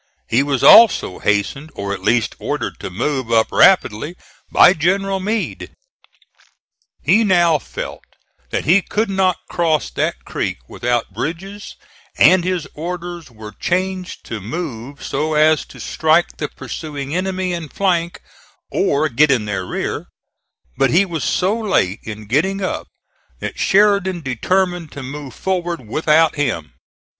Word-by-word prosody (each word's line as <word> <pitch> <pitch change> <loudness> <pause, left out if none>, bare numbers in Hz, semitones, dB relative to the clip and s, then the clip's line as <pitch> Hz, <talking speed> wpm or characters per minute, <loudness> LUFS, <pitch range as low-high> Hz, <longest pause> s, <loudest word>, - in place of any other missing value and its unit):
He 120 +4 +3
was 140 -2 -1
also 225 - +7
hastened 105 +9 -1
or 100 0 -3
at 95 - -6
least 115 +3 +1
ordered - - -3
to - - -5
move 125 +5 -2
up 115 -1 +3
rapidly 160 - +3 0.4
by - - +7
General 195 +3 0
Meade. 210 +3 -3 1.3
He 225 - +4
now 175 -6 +3
felt - - -7 0.5
that - - -2
he 180 +7 +5
could 210 +2 -2
not 190 -2 +2
cross 160 - 0
that - - -2
creek - - -3
without 120 -4 -2
bridges, 185 - -5 0.4
and 185 -1 +6
his 180 -4 -2
orders 175 0 -6
were 110 -2 -10
changed 185 - -3
to 110 -3 -6
move 135 - -6
so 155 +3 -1
as 155 +1 +4
to - - -14
strike 160 +2 +1
the - - -2
pursuing 145 -2 -6
enemy 185 0 -1
in 165 -3 -5
flank 175 -2 -1 0.5
or 145 +2 +1
get 150 +2 +3
in 125 -6 +2
their 95 -3 -3
rear; - - -3 0.7
but 135 - +3
he 185 +5 +4
was 165 -6 -4
so 190 +4 +1
late 190 - 0
in 110 -1 -8
getting 160 - 0
up 185 - -3 0.5
that - - -6
Sheridan 200 -3 +3
determined 175 - -1
to 140 - -7
move 135 -1 -8
forward 175 - -3
without 155 +5 +2
him. 85 - -2
160 Hz, 140 wpm, -19 LUFS, 125-185 Hz, 1.3 s, also